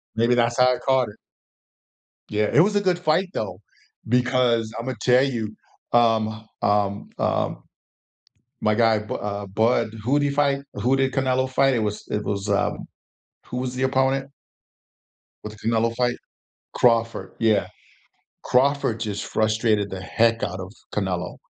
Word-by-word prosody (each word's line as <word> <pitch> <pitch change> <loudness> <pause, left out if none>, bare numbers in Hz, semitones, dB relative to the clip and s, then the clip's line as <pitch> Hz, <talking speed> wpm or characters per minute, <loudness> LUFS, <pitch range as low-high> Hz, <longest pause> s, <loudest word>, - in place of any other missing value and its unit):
Maybe 120 +2 +3
that's 120 +1 +1
how 125 0 +5
I - - -7
caught 130 -4 +1
it. 105 - -13 1.1
Yeah, 105 0 0
it 150 - +7
was 205 +4 +2
a 205 - +3
good 180 -2 +1
fight, 180 +3 +1
though, 95 -3 -4 0.5
because 125 -2 +2
Imma 130 +1 -4
tell 125 +1 +4
you, 110 -5 -2 0.4
um, 110 -2 +2 0.2
um, 100 0 0
um, - - -1 1.0
my 105 0 +2
guy 115 -1 +3
Bu 105 - -6
uh, 100 0 -4
Bud, 110 +3 +1
who 140 +5 +2
did 145 - +1
he - - -1
fight? 140 -1 +1
Who 130 +3 +1
did 135 -1 0
Canelo 130 -1 +1
fight? 135 0 +3
It 120 - +1
was 105 0 -3
it 105 - -2
was, 100 0 -3
um 100 - 0 0.6
who 125 - -5
was 125 0 -3
the 130 - -3
opponent? 135 +1 +1 1.1
With 105 0 -8
the 110 - -6
Canelo 115 0 +1
fight? 120 -1 0 0.6
Crawford. 115 -1 +1
Yeah. 110 -3 +2 0.8
Crawford 130 -3 +2
just 105 -3 -3
frustrated 110 -2 +1
the 95 - -5
heck 115 +5 +1
out 90 0 -3
of 95 +1 -8 0.2
Canelo. 90 -3 -2
115 Hz, 155 wpm, -23 LUFS, 105-130 Hz, 1.1 s, it